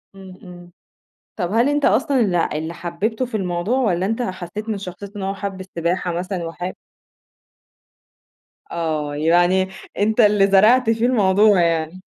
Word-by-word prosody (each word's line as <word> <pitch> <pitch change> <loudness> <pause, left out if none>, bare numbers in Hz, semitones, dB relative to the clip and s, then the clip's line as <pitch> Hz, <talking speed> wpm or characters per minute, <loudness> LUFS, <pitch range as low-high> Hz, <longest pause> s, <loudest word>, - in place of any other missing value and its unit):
إمم، 190 -1 -12
إمم، 175 -1 -12 0.7
طَب 180 -2 -3
هل 235 +4 +3
أنت 290 0 0
أصلًا 260 +5 +2
اللى 180 -7 +1
اللي 160 +2 -4
حبّبته 205 +9 -3
في 235 - -4
الموضوع 185 +5 -1
والّا 190 -8 +1
أنت 225 +4 -1
حسّيت 185 +1 -6
من 215 -2 -2
شخصيتة 195 +2 -9
إن 195 - -5
هو 195 +1 -2
حَب 195 -1 -6
السباحة 175 -1 -2
مثلًا 180 +1 -4
وحاب 175 +2 -5 2.0
آه 155 -3 -2
يعني 175 +5 +3 0.3
أنت 215 +3 0
اللي 205 -2 +5
زرعت 225 +5 +5
فيه 225 +1 +1
الموضوع 205 -4 +4
يعني. 165 +1 -1
190 Hz, 150 wpm, -20 LUFS, 175-215 Hz, 2.0 s, اللي